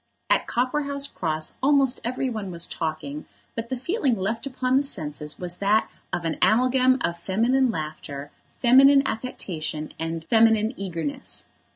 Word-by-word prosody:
At - - +3
Copperhouse 280 +3 -1
Cross 155 - -2
almost 275 -2 +3
every 255 +3 -1
one 215 -6 -4
was 170 -1 +1
talking, 155 -3 -4 0.3
but 230 0 -5
the 260 - -2
feeling 275 - 0
left 220 +6 -2
upon 255 -1 0
the - - +4
senses 150 - -4
was 180 -1 -5
that 210 +2 +2 0.2
of 175 - -2
an 160 - -1
amalgam 255 +3 +4
of 170 0 -1
feminine 240 +9 +2
laughter, 150 -5 -5 0.3
feminine 275 +3 +7
affectation, 160 -10 -4
and 165 0 -3
feminine 225 +1 +4
eagerness. 165 - -1
220 Hz, 145 wpm, -25 LUFS, 165-255 Hz, 0.3 s, feminine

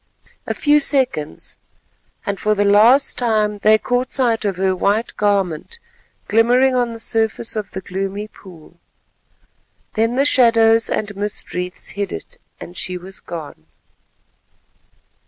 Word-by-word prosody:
A - - -2
few 295 0 +3
seconds, 255 - 0 0.7
and 200 -1 -3
for 215 0 +1
the 205 0 +1
last 225 +7 +4
time, 215 -3 0
they 215 +1 +5
caught 245 +3 -2
sight 230 -4 +1
of 200 -2 -1
her 190 0 +1
white 205 +5 -1
garment 200 - -1 0.5
glimmering 245 +4 +3
on 245 -2 0
the 230 - -8
surface 225 0 0
of 210 -2 -4
the 190 - -7
gloomy 195 +3 -4
pool. 175 -5 -16 1.1
Then 225 +2 0
the 275 +2 +2
shadows 230 -4 +4
and 210 -1 -3
mist 205 +1 -3
wreaths 180 0 -2
hid 200 -1 -4
it, - - -8 0.2
and 175 - -10
she 180 0 -4
was 185 +2 -4
gone. 155 - -9
210 Hz, 135 wpm, -19 LUFS, 190-235 Hz, 1.1 s, they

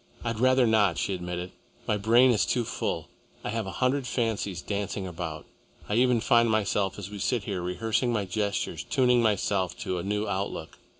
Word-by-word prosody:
"I'd 115 -2 -2
rather 130 0 +4
not," 105 -6 +3
she 100 - -1
admitted. 90 0 -4 0.4
"My 105 - +2
brain 115 +5 +5
is 110 - +2
too 125 - +1
full. - - -3 0.4
I - - -3
have 110 -2 -2
a - - -4
hundred 130 0 +1
fancies 110 -6 -1
dancing 100 -1 -3
about. 80 -3 -5 0.4
I - - -2
even 120 0 +3
find 115 0 +4
myself, 100 -2 +1
as 100 -1 -7
we 105 - -7
sit 120 +2 0
here, 95 -3 -3
rehearsing 110 +7 0
my 105 -4 0
gestures, 100 +2 -2
tuning 125 -2 +3
myself 100 -4 +1
to 90 -1 -2
a - - -4
new 105 +2 -1
outlook. 100 0 -4
105 Hz, 185 wpm, -27 LUFS, 95-115 Hz, 0.4 s, brain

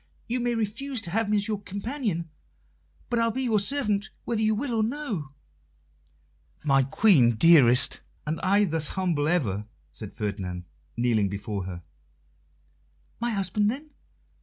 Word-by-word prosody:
You 245 +2 -1
may 240 0 0
refuse 230 +5 -2
to 170 -6 -5
have 225 +2 0
me 210 - +3
as 205 +1 +1
your 210 -2 -2
companion, 200 - -3 0.8
but 240 - +1
I'll 230 0 +2
be 260 +4 -2
your 225 -4 +2
servant, 210 -3 0 0.2
whether 230 -2 -1
you 215 0 +2
will 250 +2 -3
or 225 - +1
no." 220 - -3 1.3
"My 135 -2 +4
Queen, 135 - +4
dearest, 135 -2 +6 0.2
and 155 +2 -2
I 200 +2 +3
thus 160 -5 0
humble 170 -6 0
ever," 110 - 0 0.2
said 100 +6 -8
Ferdinand, 95 -4 -4 0.3
kneeling 115 -4 +2
before 100 -1 -4
her. 90 -2 -7 1.4
"My 240 +1 -1
husband, 205 0 0
then?" 290 +6 -6
195 Hz, 145 wpm, -26 LUFS, -, 1.4 s, dearest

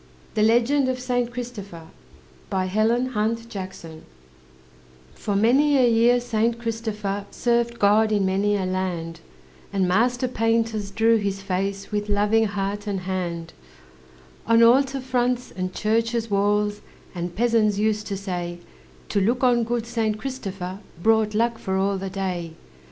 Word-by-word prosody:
THE 215 - 0
LEGEND 240 +5 +3
OF 255 -1 -2
SAINT 245 -1 -1
CHRISTOPHER 215 -9 -7 0.6
For 185 - -4
many 270 +8 +4
a 255 -2 +5
year 235 +1 +4
Saint 235 -1 0
Christopher 215 -3 -3
Served 235 -1 0
God 215 +1 +4
in 205 -2 +2
many 200 +2 +1
a 190 - -2
land; 180 -3 -3 0.5
And 195 -2 +1
master 245 +7 +2
painters 225 -3 0
drew 225 +3 +3
his 200 -2 -3
face, 195 +2 -3
With 210 0 -2
loving 210 +2 +3
heart 205 0 -3
and 195 -2 -2
hand, 175 -3 -4 0.9
On 230 0 +5
altar 270 +3 +4
fronts 250 -1 -1
and 185 0 -4
churches' 230 +2 0
walls; 205 +1 +1 0.3
And 175 -1 -5
peasants 225 -2 +2
used 210 0 0
to 200 - -3
say, 175 -3 -4 0.5
To 200 - +1
look 240 +6 +1
on 240 -2 +4
good 235 0 -2
Saint 225 -2 -1
Christopher 195 -7 -5 0.2
Brought 220 +2 +2
luck 230 +1 +1
for 190 0 -2
all 195 0 0
the 195 0 -4
day. 180 -4 -3
210 Hz, 135 wpm, -24 LUFS, 190-235 Hz, 0.9 s, a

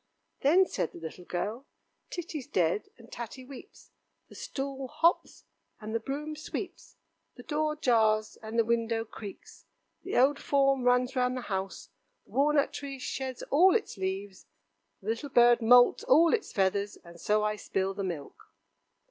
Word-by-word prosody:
Then 345 +7 +5
said 165 - -3
the - - -10
little 170 +2 -9
girl: 215 - -4 0.4
"Titty's 325 -6 -6
dead, 180 +3 0
and 230 -1 -17
Tatty 240 +2 -7
weeps, 275 - -13 0.4
the - - -14
stool 270 -1 -5
hops, 330 +7 +1 0.4
and 215 -1 -7
the 230 - +1
broom 295 +6 -5
sweeps, 305 - -7 0.4
the - - -11
door 305 0 -1
jars, 220 -6 +2
and 220 +1 -6
the 230 - +4
window 230 0 0
creaks, 210 -2 -11 0.3
the - - -3
old 275 +3 +4
form 275 -2 +2
runs 250 +1 +3
round 250 0 +1
the - - -3
house, 195 -3 -4 0.4
the - - -24
walnut 285 +1 +2
tree 275 -1 -6
sheds 260 0 -5
all 360 +8 +6
its 445 - -1
leaves, 190 0 -5 0.6
the 210 - -4
little 230 +6 -2
bird 240 -1 +5
moults 245 +2 +6
all 325 +5 +5
its 455 - -1
feathers, 200 +1 0
and 170 -1 -14
so 210 0 +2
I 210 0 0
spill 195 -2 -2
the 195 - -4
milk." 170 -7 -6
245 Hz, 160 wpm, -29 LUFS, 210-275 Hz, 0.6 s, all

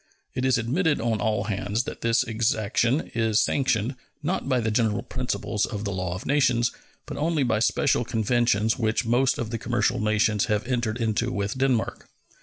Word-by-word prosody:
It 130 0 -2
is 130 -3 +3
admitted 145 +7 +1
on 115 -1 -1
all 110 -2 0
hands 100 +2 -1
that - - -7
this 115 0 +2
exaction 115 +4 0
is 115 -2 +2
sanctioned, 125 -3 +1 0.3
not 160 -2 -2
by 130 -2 +2
the 110 -1 -1
general 110 -2 +1
principles 125 -4 -2
of 105 -1 -5
the 100 - -1
law 90 -1 -3
of 95 - -7
nations, 125 -4 +2 0.3
but - - -7
only 155 -1 +1
by 115 -4 +1
special 125 +2 +2
conventions 115 -1 +1
which 110 +1 0
most 125 +3 +2
of 115 -1 -4
the 115 - -3
commercial 120 +1 0
nations 105 -1 +2
have 105 -2 -1
entered 120 -3 -1
into 115 +1 0
with 100 -3 -2
Denmark. 130 -3 -1
115 Hz, 180 wpm, -25 LUFS, 110-125 Hz, 0.3 s, is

